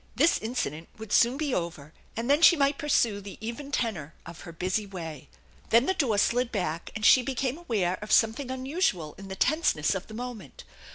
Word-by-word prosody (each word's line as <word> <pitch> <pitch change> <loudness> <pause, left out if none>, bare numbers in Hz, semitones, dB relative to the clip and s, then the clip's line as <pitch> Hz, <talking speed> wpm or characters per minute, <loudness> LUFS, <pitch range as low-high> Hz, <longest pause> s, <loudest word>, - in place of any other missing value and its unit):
This 305 +6 +3
incident 170 - -4
would 220 -2 -9
soon 240 +3 +4
be 295 -3 -1
over, 165 -5 -4 0.2
and 230 +1 -2
then 290 +3 +3
she 345 - +8
might 280 -1 +1
pursue 230 -8 +1
the 200 0 -10
even 235 +6 -6
tenor 180 - -2
of 170 0 -10
her 170 - -9
busy 185 +5 -2
way. 165 -7 -8 0.4
Then 235 +3 +5
the 380 - +1
door 260 - +1
slid 240 +4 +1
back 170 -6 -3
and 220 - -2
she 255 - +7
became 265 +3 -2
aware 200 - -1
of 210 +1 -7
some 225 0 +5
thing 265 +2 -7
unusual 260 - -1
in 195 - -9
the 190 - -6
tenseness 265 - +1
of 190 -1 -5
the 215 - -10
moment. 235 - -8
225 Hz, 205 wpm, -27 LUFS, 185-265 Hz, 0.4 s, she